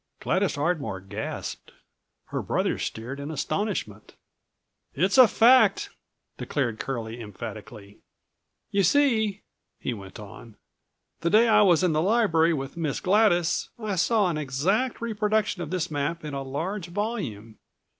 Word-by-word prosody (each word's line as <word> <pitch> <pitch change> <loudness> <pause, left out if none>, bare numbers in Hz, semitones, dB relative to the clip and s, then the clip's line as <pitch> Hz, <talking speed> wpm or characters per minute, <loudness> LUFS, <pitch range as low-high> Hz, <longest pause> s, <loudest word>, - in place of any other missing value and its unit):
Gladys - - 0
Ardmore 145 - -1
gasped. 95 +1 -6 0.6
Her - - -2
brother - - -1
stared 125 +5 -5
in 140 +1 -6
astonishment. 155 - -3 0.8
"It's 190 - +2
a 255 - +10
fact!" 250 +4 +4 0.5
declared 120 -7 -2
Curlie 120 -3 -4
emphatically. 105 -1 -9 0.7
"You 200 - +2
see," 220 - +2 0.4
he 125 - -3
went 95 -3 -10
on, 105 +2 -12 0.6
"the 170 - 0
day 220 +5 +5
I 220 - +5
was 185 -3 +4
in 180 -3 +2
the 155 - +2
library 180 -5 +3
with 135 -2 -4
Miss 160 -4 -2
Gladys 185 -4 +2
I 215 -3 -3
saw 205 +3 +2
an 160 -3 -1
exact 180 - -1
reproduction 215 -3 0
of 160 - -5
this 180 -1 -2
map 155 +3 -2
in 150 - -5
a 140 - -3
large 165 +8 -4
volume. 170 - -4
165 Hz, 135 wpm, -26 LUFS, 130-210 Hz, 0.8 s, a